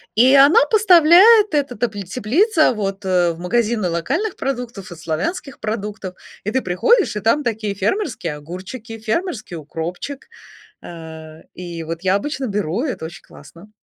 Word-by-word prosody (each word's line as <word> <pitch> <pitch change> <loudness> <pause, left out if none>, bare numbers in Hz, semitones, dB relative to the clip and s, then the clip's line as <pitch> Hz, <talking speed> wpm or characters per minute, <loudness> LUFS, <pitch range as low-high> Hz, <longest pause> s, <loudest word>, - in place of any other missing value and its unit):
И 255 +5 +5
она 285 - +6
поставляет, 405 +1 +6
эта 280 -4 0
т 220 -4 -2
теплица, 270 - +2
вот 195 -2 -4
в 175 -3 +2
магазины 215 +1 0
локальных 270 - -2
продуктов 240 -8 -5
и - - -8
славянских 170 - -4
продуктов. 210 -3 -5 0.3
И 210 - -2
ты 260 - 0
приходишь, 255 - +2
и 210 - -3
там 230 +8 +2
такие 220 -3 -2
фермерские 200 - -2
огурчики, 190 - -9
фермерский 220 - -3
укропчик. 165 - -6 0.6
А, 160 -2 -10 0.2
и 170 -2 -7
вот 165 +1 -6
я 190 0 +2
обычно 265 +5 -3
беру- 200 -1 -2
это 255 - -4
очень 165 - -10
классно. 170 +8 -16
215 Hz, 145 wpm, -19 LUFS, 175-275 Hz, 0.6 s, она